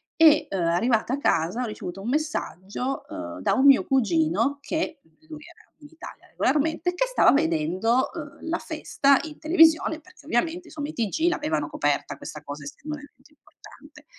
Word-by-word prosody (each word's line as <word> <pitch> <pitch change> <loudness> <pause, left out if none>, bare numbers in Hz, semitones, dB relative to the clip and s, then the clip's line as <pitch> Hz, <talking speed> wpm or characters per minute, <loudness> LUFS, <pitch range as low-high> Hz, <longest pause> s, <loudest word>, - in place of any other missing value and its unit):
E, 310 -1 +5
uhm, 195 - -2
arrivata 220 +8 +1
a - - 0
casa, 185 - +1
ho - - -1
ricevuto 195 -3 -7
un 205 - -7
messaggio, 265 - -3
uhm, 85 0 -7
da - - +1
un 265 - +2
mio 275 -1 +7
cugino, 220 - +1
che 320 +2 -3
l 160 - -29 0.2
lui 310 -1 -10
era, - - -24
in 295 - -13
Italia, 325 - -12
regolarmente, 320 +4 0
che 430 +8 +1
stava - - +4
vedendo, 225 - +1
uhm, 315 -1 -9
la 335 - 0
festa, 280 -3 +1
in 310 -2 -8
televisione, 320 -1 +4
perché, 365 +4 -19
ovviamente, 335 +8 -1
insomma, 295 -3 -5
i - - -7
TG 315 - 0
avevano 155 - -2
coperta, 145 -1 -1
questa 150 - -9
cosa, 145 0 -8
essendo 300 - -7
un 295 - -11
evento 285 -1 -18
importante, - - -18
275 Hz, 180 wpm, -25 LUFS, 185-315 Hz, 0.2 s, mio